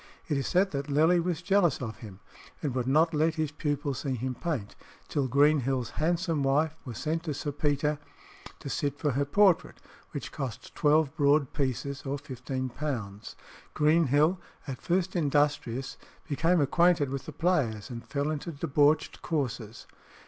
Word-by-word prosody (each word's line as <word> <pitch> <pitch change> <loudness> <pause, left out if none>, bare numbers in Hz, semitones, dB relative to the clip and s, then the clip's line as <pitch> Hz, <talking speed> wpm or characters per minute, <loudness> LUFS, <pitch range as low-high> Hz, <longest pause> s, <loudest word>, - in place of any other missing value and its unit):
It 150 - 0
is 135 -2 -1
said 190 +2 +2
that 140 0 -3
Lely 160 +5 +4
was 175 -1 -2
jealous 185 -5 +3
of 115 -4 -5
him, 100 -4 -11 0.4
and 145 -4 -1
would 125 -1 -1
not 160 +5 +3
let 155 +1 +2
his 155 -3 -1
pupil 145 -2 -2
see 135 0 -3
him 130 +2 -3
paint, 125 -8 -4 0.3
till 140 -3 0
Greenhill's 135 -2 +2
handsome 165 -1 0
wife 145 +3 +2
was 120 -4 -6
sent 160 +5 -1
to 150 -3 -2
Sir 145 +1 -3
Peter 145 +1 0 0.6
to - - -7
sit 140 +1 -2
for 150 0 0
her 140 +2 0
portrait, 190 +4 +3 0.3
which - - -6
cost 130 -6 -6
twelve 150 -2 +2
broad 145 -1 +3
pieces 140 0 -2
or 140 +1 -2
£15. 130 -5 -5 0.4
Greenhill, 155 +2 +3 0.3
at 130 -3 -5
first 185 +1 0
industrious, 145 -5 0 0.3
became 165 +4 +2
acquainted 155 -1 +3
with 135 -1 -5
the - - -5
players, 140 - 0
and 115 -1 -8
fell 140 +2 -1
into 155 +3 -4
debauched 145 +1 +1
courses. 125 -8 -3
145 Hz, 155 wpm, -29 LUFS, 135-160 Hz, 0.6 s, Lely